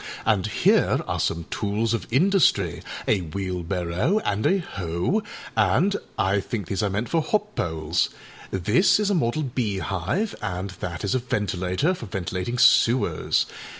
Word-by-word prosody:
And 105 -3 +2
here 105 - +3
are - - -2
some 85 0 -1
tools 105 +2 0
of 115 - -2
industry, 135 - +3 0.3
a 105 - +3
wheelbarrow 90 - -1
and 105 +1 +1
a 195 - +3
hoe, 95 - -2 0.3
and 110 - +3 0.2
I 95 +2 +2
think 100 +1 -4
these 100 +4 -2
are 105 - +1
meant 105 +5 -2
for 165 - +1
hop 210 +6 -1
poles. 80 0 0 0.4
This 110 - +3
is 210 -1 +1
a - - +3
model 155 -3 0
beehive, 120 - -2
and 95 -1 -3
that 85 +2 -5
is 100 - 0
a 130 - +2
ventilator, 105 - 0
for 120 - -7
ventilating 95 +3 -3
sewers. 120 0 +4
105 Hz, 150 wpm, -24 LUFS, 90-130 Hz, 0.4 s, sewers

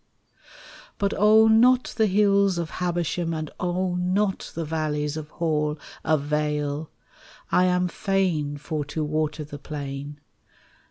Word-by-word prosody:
But 200 0 0
oh, 220 +1 +6
not 245 +3 +4
the 220 -1 +3
hills 200 -1 +3
of 170 -1 -3
Habersham, 175 -1 -1
And 155 -1 -4
oh, 180 0 -1
not 190 +2 0
the 165 - -3
valleys 150 -1 -2
of 155 -1 -6
Hall 150 -2 -1 0.3
Avail: 150 0 -1 0.6
I 180 - +4
am 180 0 +2
fain 175 -7 0
for 150 +1 -3
to 155 +2 -3
water 155 0 -1
the 145 0 -9
plain. 145 0 -6
160 Hz, 125 wpm, -25 LUFS, 150-185 Hz, 0.6 s, oh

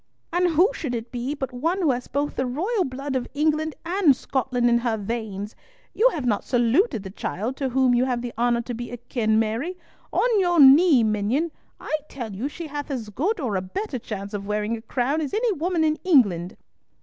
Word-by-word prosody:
"And 355 0 +3
who 345 +5 +5
should 280 - -3
it 230 0 -6
be 250 +4 -3
but 265 -3 -5
one 330 +10 -1
who 300 - +4
has 245 0 -3
both 285 +1 -2
the 260 - -1
royal 370 - 0
blood 270 +1 -4
of 250 -2 -1
England 310 +1 +1
and 345 -5 +4
Scotland 250 -2 -1
in 235 0 +4
her 235 -2 -1
veins? 210 -1 -4 0.4
You 485 +4 +4
have 300 - -4
not 215 -4 +1
saluted 245 - +2
the 190 - -7
child 220 +5 -4
to 270 -2 -1
whom 255 0 +3
you 245 +1 +3
have 245 -2 -1
the 245 - -5
honour 235 0 +1
to 245 - -5
be 240 +1 -6
akin, 235 -2 -1
Mary! 230 +12 -1 0.3
On 470 -4 +2
your 350 -3 +2
knee, 280 -1 +7
minion; 220 +10 0 0.3
I - - -2
tell 235 -6 -6
you 220 +8 -3
she 335 +3 -7
hath 290 -1 -5
as 240 -6 -4
good 350 - -1
or 240 -9 -2
a 185 - 0
better 255 - -4
chance 205 -3 -6
of 200 -1 -4
wearing 210 +2 -1
a 225 - -8
crown 260 +6 -1
as 295 +4 -3
any 455 +1 +2
woman 345 -1 0
in 310 0 +1
England." 205 - +3
255 Hz, 210 wpm, -24 LUFS, 230-310 Hz, 0.4 s, knee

